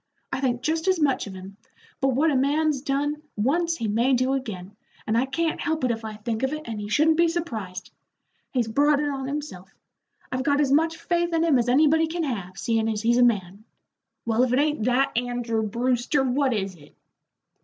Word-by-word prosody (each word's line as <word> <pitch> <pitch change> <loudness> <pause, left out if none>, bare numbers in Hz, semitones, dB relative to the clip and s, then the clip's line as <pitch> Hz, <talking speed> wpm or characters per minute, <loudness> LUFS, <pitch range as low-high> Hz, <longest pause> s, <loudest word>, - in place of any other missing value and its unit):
"I - - -1
think 250 -2 -1
just 320 +4 -1
as 375 -2 +3
much 280 -7 +1
of 195 - -8
him, 190 +1 -10 0.4
but 270 - +1
what 280 +5 +2
a - - +1
man's 285 +1 +1
done 290 +2 -1
once 330 +10 +1
he 225 - -2
may 235 +6 +2
do 255 +2 +1
again, 205 -7 -5 0.3
and 220 - 0
I 250 +3 +2
can't 330 +4 -1
help 320 -2 -1
it 250 - +2
if 225 -1 -4
I 215 -1 -6
think 220 +1 -4
of 265 +1 0
it, 305 0 -5
and 225 -2 -5
he 205 - -6
shouldn't 310 +8 +3
be 340 0 +4
surprised. 225 - -4 0.6
He's 245 -4 0
brought 285 +5 +3
it 295 - 0
on 270 -2 -4
himself. 275 -11 -6 0.6
I've 255 - -1
got 285 +1 +1
as 285 -2 +2
much 325 +3 +2
faith 345 0 -1
in 325 0 +2
him 305 -6 +4
as 240 0 0
anybody 310 +5 +4
can 335 +1 -3
have, 195 - -4
seein' 225 +1 0
as 215 -1 -2
he's 235 +1 +3
a - - +6
man. 200 -4 0 0.6
Well, 230 +1 +1
if 255 - +1
it - - +3
ain't 295 -5 +1
that, 250 +1 +1
Andrew 240 -2 -1
Brewster, 245 +5 0
what 265 +1 +1
is 195 -4 -2
it?" 150 -5 -18
255 Hz, 215 wpm, -25 LUFS, 225-300 Hz, 0.6 s, a